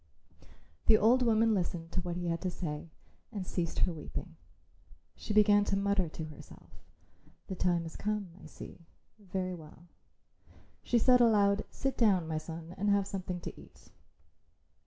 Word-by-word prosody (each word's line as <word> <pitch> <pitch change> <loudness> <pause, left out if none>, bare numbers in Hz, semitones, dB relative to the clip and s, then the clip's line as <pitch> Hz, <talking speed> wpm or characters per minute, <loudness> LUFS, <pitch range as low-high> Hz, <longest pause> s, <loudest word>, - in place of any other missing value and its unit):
The 220 - +8
old 235 +5 +4
woman 225 -1 +4
listened 170 -3 -2
to 185 - -1
what 175 -1 -4
he 175 0 -3
had 170 -1 -1
to 185 - -1
say 160 -3 -5 0.4
and 200 -5 -4
ceased 170 -2 -2
her 180 - -3
weeping. 155 - -7 0.8
She - - -6
began 205 -1 +5
to 195 - 0
mutter 200 -3 +1
to 160 0 -6
herself, 155 -2 -13 0.7
"The 190 - -5
time 175 -2 +1
has 165 - -8
come, 210 -3 -2
I - - -11
see. 155 - -11 0.4
Very 185 -2 -3
well," 165 0 -12 0.9
she 240 - +1
said 250 +2 +5
aloud; 205 -3 +4
"sit 270 -1 -3
down, 195 -8 +3
my 160 -1 -1
son, 165 +1 -8
and 205 +1 +1
have 200 -1 +3
something 185 -2 -4
to - - -8
eat." - - -19
185 Hz, 160 wpm, -32 LUFS, 170-210 Hz, 0.9 s, The